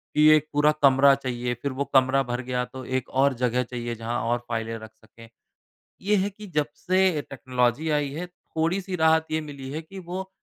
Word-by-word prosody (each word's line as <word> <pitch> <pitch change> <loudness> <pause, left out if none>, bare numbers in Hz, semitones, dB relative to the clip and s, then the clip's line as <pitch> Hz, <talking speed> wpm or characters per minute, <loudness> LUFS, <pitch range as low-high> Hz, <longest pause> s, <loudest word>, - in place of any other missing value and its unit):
कि 150 0 +6
एक 155 0 +1
पूरा 150 +1 +4
कमरा 140 0 +7
चाहिए। 125 -2 -3
फ़िर 140 - -2
वो 135 +2 -2
कमरा 130 0 +4
भर 120 0 -3
गया 125 -1 0
तो 130 +1 -9
एक 130 0 -2
और 135 +1 +3
जगह 125 +1 +2
चाहिए 120 -1 -5
जहाँ 115 +1 -3
और 120 0 +1
फाइलें 115 0 -3
रख 110 0 -12
सकें। 115 +1 -17 0.7
ये 210 +2 +2
है 200 +1 0
कि 210 +1 -11
जब 150 -5 -1
से 185 -3 +2
टेक्नोलॉज़ी 130 +2 0
आई 150 -1 +1
है 165 +5 -5
थोड़ी-सी 180 +1 -3
राहत 160 -1 +3
ये 155 0 0
मिली 140 -3 -8
है 155 +3 -4
कि 190 +5 -11
वो 185 +1 -6
140 Hz, 200 wpm, -25 LUFS, 125-160 Hz, 0.7 s, कमरा